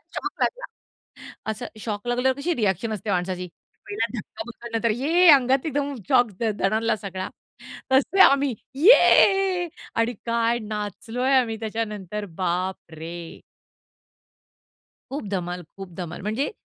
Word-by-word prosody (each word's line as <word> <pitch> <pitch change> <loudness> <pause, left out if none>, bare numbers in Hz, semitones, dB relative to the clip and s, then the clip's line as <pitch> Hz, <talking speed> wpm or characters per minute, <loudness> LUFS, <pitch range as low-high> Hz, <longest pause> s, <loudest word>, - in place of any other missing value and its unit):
Shock - - -4
लागला. - - 0 0.9
असं 220 +3 -4
shock 210 +1 -4
लागल्यावर 250 +2 +1
कशी 340 +5 0
रिएक्शन 220 - 0
असते 210 0 -4
माणसाची. 180 -1 -2 0.4
पहिला 410 - -1
धक्का - - -7
बसल्यानंतर 235 -1 -2
ये 345 +5 +5
अंगात 265 0 +4
एकदम 285 -2 -1
शॉक 245 -3 +4
द - - 0 0.2
दणाणला 220 +4 +1
सगळा. 190 -3 -5 0.6
तसे 280 +9 +3
आम्ही 275 -5 +4 0.3
ये 390 -5 +6 0.3
आणि 230 +1 +1
काय 235 0 +1
नाचलोय 215 +5 -2
आम्ही 235 -4 +2
त्याच्यानंतर, 210 -3 -4
बापरे! 175 -2 -4 1.7
खूप 275 -3 -4
धमाल, 180 -2 -3 0.2
खूप 195 -2 -8
धमाल, 175 -3 -6
म्हणजे, 220 - -2
230 Hz, 120 wpm, -24 LUFS, 195-270 Hz, 1.7 s, ये